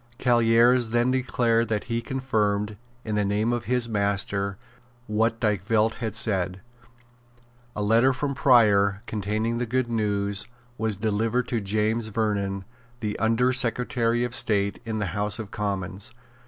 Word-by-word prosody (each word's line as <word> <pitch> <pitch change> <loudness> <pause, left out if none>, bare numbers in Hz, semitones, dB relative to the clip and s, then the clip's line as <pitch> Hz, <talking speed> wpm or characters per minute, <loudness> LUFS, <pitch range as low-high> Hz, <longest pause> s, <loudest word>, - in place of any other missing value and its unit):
Callieres 120 0 +4
then 120 +2 +2
declared 120 -3 +1
that 105 -2 -1
he 115 0 -2
confirmed, 105 -6 -1 0.3
in 110 - -3
the 105 0 +1
name 105 +4 0
of 120 -1 -3
his 125 -1 0
master, 100 -2 -1 0.5
what 115 +1 0
Dykvelt 110 +1 +1
had 110 -3 -3
said. 95 -3 0 1.2
A 105 - -2
letter 115 +5 +4
from 140 +2 -2
Prior, 105 -7 +4
containing 110 +3 -2
the 125 - -2
good 125 +1 0
news, 100 -2 -1 0.3
was 110 -3 -2
delivered 110 +3 0
to 115 -3 -1
James 110 +3 0
Vernon, 100 -3 -2 0.3
the 105 -3 -3
Under 115 +3 +2
Secretary 120 -1 +1
of 120 -1 -3
State, 100 -4 +1
in 110 -1 -3
the 105 - -1
House 105 0 0
of 110 -3 -7
Commons. 100 -2 -4
110 Hz, 140 wpm, -25 LUFS, 105-120 Hz, 1.2 s, Callieres